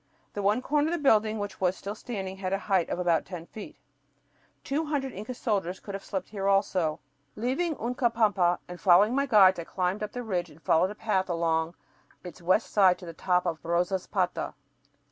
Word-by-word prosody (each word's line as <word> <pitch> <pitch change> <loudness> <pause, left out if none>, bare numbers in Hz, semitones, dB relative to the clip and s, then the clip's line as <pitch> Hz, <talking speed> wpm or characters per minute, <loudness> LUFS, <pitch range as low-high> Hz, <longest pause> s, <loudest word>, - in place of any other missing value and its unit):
The 205 - -3
one 210 +5 +1
corner 295 +2 +1
of 330 - -1
the - - +1
building 220 -7 +3
which 205 -2 -6
was 185 0 +1
still 200 - -5
standing 195 -4 -6
had 190 -1 -3
a - - +2
height 190 -3 0
of - - -2
about 175 -2 +2
ten 180 -3 -8
feet. 210 +4 -10 0.9
Two 290 +4 -1
hundred 280 -3 -2
Inca 215 +6 -6
soldiers 195 -6 -1
could 200 - -9
have 195 - -5
slept 190 -3 -4
here 195 -2 -3
also. 190 -5 +1 0.4
Leaving 270 +9 -1
Uncapampa 225 -7 +1
and 180 0 -9
following 200 +4 +5
my 280 +1 +1
guides, 190 -6 +6
I - - -3
climbed 185 +4 -2
up 210 -1 -4
the 245 - -4
ridge 180 -6 -2
and 150 +1 -17
followed 165 +3 +2
a 210 - -7
path 195 -4 -1
along 165 -1 0 0.5
its 180 0 -10
west 185 +6 +1
side 190 -3 +5
to 180 - -11
the 165 - -8
top 180 +2 +1
of 165 -3 -2
Rosaspata. 175 +2 -1
195 Hz, 200 wpm, -28 LUFS, 180-220 Hz, 0.9 s, guides